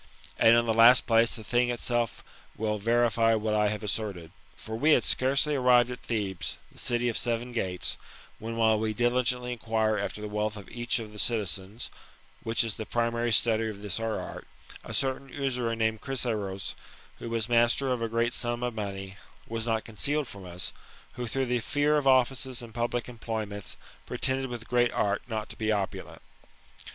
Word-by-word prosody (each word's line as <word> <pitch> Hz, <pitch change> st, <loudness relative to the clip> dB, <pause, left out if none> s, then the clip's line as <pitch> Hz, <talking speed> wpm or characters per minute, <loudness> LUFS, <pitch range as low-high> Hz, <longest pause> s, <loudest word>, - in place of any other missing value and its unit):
And 115 Hz, +1 st, +7 dB
in 120 Hz, -, +3 dB
the 115 Hz, -, +1 dB
last 115 Hz, +3 st, +7 dB
place, 115 Hz, 0 st, +4 dB
the 110 Hz, -, -6 dB
thing 120 Hz, +3 st, +1 dB
itself 120 Hz, -1 st, -1 dB, 0.3 s
will 105 Hz, -1 st, -1 dB
verify 115 Hz, +1 st, +3 dB
what 110 Hz, 0 st, -1 dB
I 105 Hz, 0 st, +3 dB
have 105 Hz, +1 st, -4 dB
as 105 Hz, -, -1 dB
serted. 95 Hz, -7 st, -4 dB, 0.2 s
For 110 Hz, -, -7 dB
we 150 Hz, +7 st, +4 dB
had -, -, +4 dB
scarcely 140 Hz, +3 st, +3 dB
arrived 125 Hz, -2 st, +4 dB
at 125 Hz, -, -6 dB
Thebes, 95 Hz, -8 st, -3 dB
the -, -, -13 dB
city 120 Hz, 0 st, 0 dB
of 115 Hz, -, -1 dB
seven 120 Hz, +1 st, -1 dB
gates, 95 Hz, -6 st, -2 dB, 0.4 s
when, 115 Hz, +1 st, -5 dB
while 110 Hz, -1 st, +4 dB
we 110 Hz, -1 st, -1 dB
diligently 125 Hz, +1 st, +1 dB
inquire 110 Hz, -2 st, 0 dB
after 100 Hz, -, -3 dB
the 105 Hz, -, -5 dB
wealth 105 Hz, 0 st, -2 dB
of 100 Hz, -, -10 dB
each 120 Hz, +1 st, -1 dB
of 110 Hz, -3 st, -6 dB
the 105 Hz, -, -9 dB
citiaens, 105 Hz, 0 st, -1 dB, 0.5 s
(which 115 Hz, +1 st, +2 dB
is 115 Hz, -3 st, -3 dB
the 110 Hz, -, -4 dB
primary 115 Hz, 0 st, 0 dB
study 110 Hz, 0 st, +3 dB
of 100 Hz, -1 st, -8 dB
this 105 Hz, +2 st, -1 dB
our 115 Hz, -1 st, -2 dB
art,) -, -, -8 dB, 0.4 s
a -, -, -8 dB
certain 135 Hz, 0 st, 0 dB
usurer 125 Hz, -4 st, -1 dB
named 110 Hz, -1 st, 0 dB
Chryseros, 110 Hz, -8 st, -2 dB, 0.5 s
who 115 Hz, -, -6 dB
was 115 Hz, -1 st, -1 dB
master 120 Hz, +3 st, +3 dB
of 125 Hz, -2 st, -1 dB
a 115 Hz, -, -1 dB
great 115 Hz, +2 st, +1 dB
sum 120 Hz, 0 st, 0 dB
of 125 Hz, -1 st, -1 dB
money, 100 Hz, -2 st, -5 dB, 0.3 s
was 115 Hz, 0 st, -3 dB
not 110 Hz, -1 st, 0 dB
concealed 140 Hz, +6 st, +1 dB
from 100 Hz, -4 st, -10 dB
as, 90 Hz, 0 st, -4 dB, 0.4 s
who, 120 Hz, -1 st, -5 dB
through 135 Hz, +4 st, -1 dB
the 125 Hz, -1 st, 0 dB
fear 145 Hz, +5 st, +1 dB
of 145 Hz, -2 st, 0 dB
offices 130 Hz, -1 st, +2 dB
and 115 Hz, -2 st, -11 dB
public 120 Hz, +1 st, -1 dB
employments, 110 Hz, -4 st, -5 dB, 0.3 s
pretended 130 Hz, 0 st, 0 dB
with 120 Hz, -2 st, -7 dB
great 120 Hz, -1 st, +2 dB
art 100 Hz, -1 st, +1 dB
not 110 Hz, -3 st, -3 dB
to -, -, -9 dB
be 110 Hz, -1 st, -1 dB
opulent. 100 Hz, -3 st, -3 dB
115 Hz, 190 wpm, -28 LUFS, 110-120 Hz, 0.5 s, And